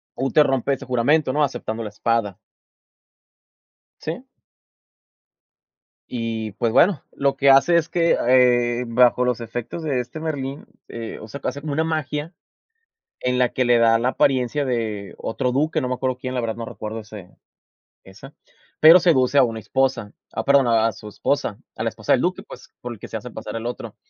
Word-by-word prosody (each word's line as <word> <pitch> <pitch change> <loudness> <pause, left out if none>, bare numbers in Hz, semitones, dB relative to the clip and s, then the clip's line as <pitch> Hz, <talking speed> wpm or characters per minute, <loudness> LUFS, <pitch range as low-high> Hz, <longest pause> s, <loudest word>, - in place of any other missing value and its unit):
Úter 135 +3 +3
rompe 135 +1 0
ese - - -6
juramento, 130 +4 +2
¿no?, 150 - +2
aceptando 115 -4 -3
la 105 - -5
espada. 105 -2 -1 1.6
¿Sí? - - -5 1.9
Y, 115 -3 -4
pues, 115 +3 -1
bueno, 175 +1 +4
lo 140 0 0
que 140 - +2
hace 135 +6 +6
es 165 -2 +1
que, 170 -1 +2
eh, 125 -1 +3
bajo 125 +1 +3
los 125 -1 0
efectos 120 +7 -6
de 140 -5 -1
este 125 +6 -7
Merlín, 140 -3 -4 0.2
eh, 115 -1 -7
o 110 - -10
sea, 140 +6 -8
hace 140 +3 -3
como 150 -2 -4
una 160 +3 0
magia 155 +1 -3 0.9
en 125 0 0
la 125 -1 +2
que 130 - 0
le 120 -1 +4
da 115 -1 +4
la 125 - +1
apariencia 130 +2 +1
de 110 -6 -3
otro 125 +2 -2
duque, 155 +4 0
no 130 - -2
me 125 - -1
acuerdo 130 0 -2
quién, 130 0 -5
la 125 - 0
verdad, 115 -2 -3
no 115 - -5
recuerdo 110 0 -6
ese 105 -4 -11 0.8
esa, 105 +9 -13 0.5
pero 165 +4 +9
seduce 145 -6 +3
a - - +7
una 115 -3 -1
esposa, 130 -2 -1 0.2
ah, 110 - -3
perdón, 140 -1 +4
a 115 -1 +3
a 115 - 0
su 105 +2 -11
esposa, - - -2 0.2
a - - -4
la - - 0
esposa - - -2
del - - +4
duque, - - -1
pues, - - -13
por 120 - -6
el 115 - -10
que - - -9
se - - -5
hace 120 +3 -7
pasar 110 -1 -7
el 115 +1 -5
otro. 120 - -6
125 Hz, 190 wpm, -22 LUFS, 115-140 Hz, 1.9 s, pero